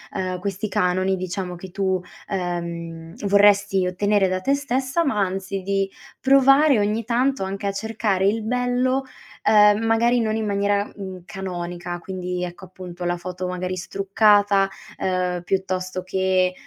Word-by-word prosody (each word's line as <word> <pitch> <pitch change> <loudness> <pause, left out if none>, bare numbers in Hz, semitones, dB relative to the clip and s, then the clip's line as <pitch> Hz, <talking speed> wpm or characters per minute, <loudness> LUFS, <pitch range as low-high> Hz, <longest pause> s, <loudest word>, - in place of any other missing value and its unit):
ehm, 185 -1 -2
questi 200 +3 -3
canoni, 185 +1 +1
diciamo 185 0 -4
che 180 +1 -10
tu, 190 -1 0 0.3
ehm, 170 -3 -4
vorresti 200 -1 +4
ottenere 195 +2 +2
da 185 0 -1
te 275 +9 +1
stessa, 270 +3 -1
ma 265 -8 0
anzi 195 0 -2
di 195 0 -1 0.3
provare, 275 0 +5
ogni 210 +2 0
tanto, 250 +1 +1
anche 195 +1 -3
a 200 - -1
cercare 200 -2 0
il 220 +2 0
bello, 250 +3 0 0.4
ehm, 210 0 +5
magari 235 +2 +3
non 220 -1 0
in 220 - -2
maniera, 200 0 0
mhmm, 190 -3 -8
canonica, 175 -2 -5
quindi 180 0 -4
ecco, 175 +2 -9
appunto, 180 -1 -9
la 175 0 0
foto 180 +1 -5
magari 180 0 -3
struccata, 200 +1 +3 0.3
ehm, 180 -1 -1
piuttosto 185 0 -2
che, 185 0 +1
195 Hz, 145 wpm, -23 LUFS, 185-210 Hz, 0.4 s, provare